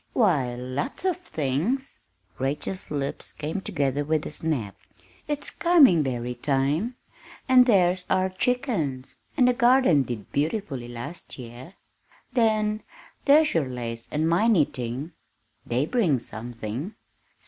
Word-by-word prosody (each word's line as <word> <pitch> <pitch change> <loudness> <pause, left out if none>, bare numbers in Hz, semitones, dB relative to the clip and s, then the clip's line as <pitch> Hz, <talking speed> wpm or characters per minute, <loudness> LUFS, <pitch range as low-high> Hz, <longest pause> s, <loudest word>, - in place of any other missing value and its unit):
why 145 - +2
lots 130 - -4
of 370 -2 +2
things!" 210 - -2 0.4
Rachel's 145 +8 -3
lips 140 -2 -3
came 155 +6 -4
together 140 -4 -1
with 155 +1 0
a - - -5
snap. 145 -11 -2 0.5
"It's 295 -1 -3
coming 300 - +5
berry 125 -3 -2
time, 145 - 0 0.5
and 255 -1 +6
there's 185 -4 +3
our 185 0 +2
chickens, 185 - -2 0.2
and 250 - +5
the 250 - +4
garden 245 - +4
did 120 -6 -5
beautifully 145 - -2
last 120 +8 -8
year. 125 +8 -10 0.6
Then 215 -3 +2 0.4
there's 300 +2 +5
your 160 -5 +1
lace 115 -2 -5
work - - -17
and 155 +2 +1
my 175 +7 +3
knitting 140 - 0 0.6
they 125 +4 +1
bring 180 - +2
something. 120 - -6
155 Hz, 125 wpm, -25 LUFS, -, 0.6 s, and